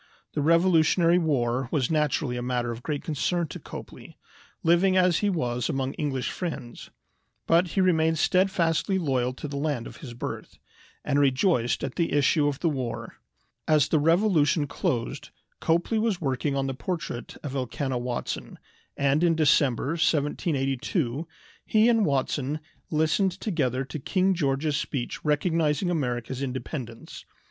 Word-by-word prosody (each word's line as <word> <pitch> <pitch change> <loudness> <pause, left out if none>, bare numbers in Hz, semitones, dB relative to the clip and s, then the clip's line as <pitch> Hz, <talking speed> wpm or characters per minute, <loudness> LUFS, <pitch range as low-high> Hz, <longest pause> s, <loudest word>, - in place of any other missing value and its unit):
The 150 - -1
Revolutionary 170 +1 +4
War 130 -6 0
was 140 -4 0
naturally 150 -4 0
a 120 - -3
matter 120 -1 -1
of 115 +1 -7
great 145 +1 -3
concern 170 +3 -1
to - - -7
Copley, - - -10 0.5
living 180 +3 +4
as 180 -2 +4
he 205 - +1
was 125 - -1
among 135 0 -1
English 135 -5 -2
friends; 155 -9 -6 0.6
but 170 +2 +4
he - - +5
remained 160 -3 +3
steadfastly 185 +1 +2
loyal 130 -7 0
to 140 - -7
the 140 0 -5
land 140 -5 -1
of 115 - -10
his 130 -5 -9
birth, 120 - -6 0.5
and 145 -1 +2
rejoiced 135 - +2
at 135 -2 -3
the 170 - 0
issue 145 +1 +3
of 140 -2 -2
the 170 - +2
war. 130 -6 -4 0.5
As 155 -3 +4
the 155 - +3
Revolution 165 -2 +3
closed 125 -4 -3 0.3
Copley 170 +7 +1
was 215 -4 0
working 140 -1 -1
on 135 -1 0
the 135 - -2
portrait 155 -3 -5
of 140 -3 -5
Elkanah 130 0 -2
Watson, 120 0 -4 0.4
and 140 +3 +2
in 170 -1 +4
December, 140 -4 +3
1782, 145 - 0 0.4
he 215 +1 +3
and 225 -5 +3
Watson 140 +1 -1 0.3
listened 160 +5 +2
together 140 - -1
to 135 +3 -6
King 190 +6 +1
George's 145 -2 0
speech 130 -5 -4
recognizing 160 +2 +1
America's 125 -4 -2
independence. 125 -2 -6
150 Hz, 145 wpm, -26 LUFS, 130-170 Hz, 0.6 s, he